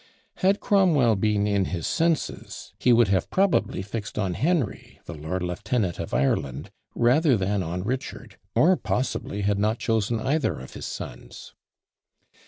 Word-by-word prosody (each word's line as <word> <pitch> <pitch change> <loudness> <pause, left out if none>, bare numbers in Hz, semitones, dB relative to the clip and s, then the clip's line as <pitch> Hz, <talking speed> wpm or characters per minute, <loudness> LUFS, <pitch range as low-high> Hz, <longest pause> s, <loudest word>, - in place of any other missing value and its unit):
Had 195 +2 +2
Cromwell 160 - +3
been 105 0 +1
in 100 -2 +1
his 85 -3 -4
senses, 165 -1 -2
he 125 - +3
would 115 -3 +5
have 95 -1 +1
probably 190 - +1
fixed 105 +2 -6
on 95 -4 0
Henry, 150 - -1
the - - -7
lord 80 +4 -4
lieutenant 90 +2 -2
of - - -5
Ireland, 70 0 -1 0.2
rather 130 +2 +4
than 100 +1 0
on 90 +1 -3
Richard, 130 +6 -5 0.2
or 185 +4 +5
possibly 125 -5 -2
had 100 0 +1
not 110 +3 +1
chosen 115 0 0
either 140 +6 0
of 65 - -10
his - - -6
sons! - - -8
105 Hz, 150 wpm, -25 LUFS, 95-135 Hz, 0.2 s, would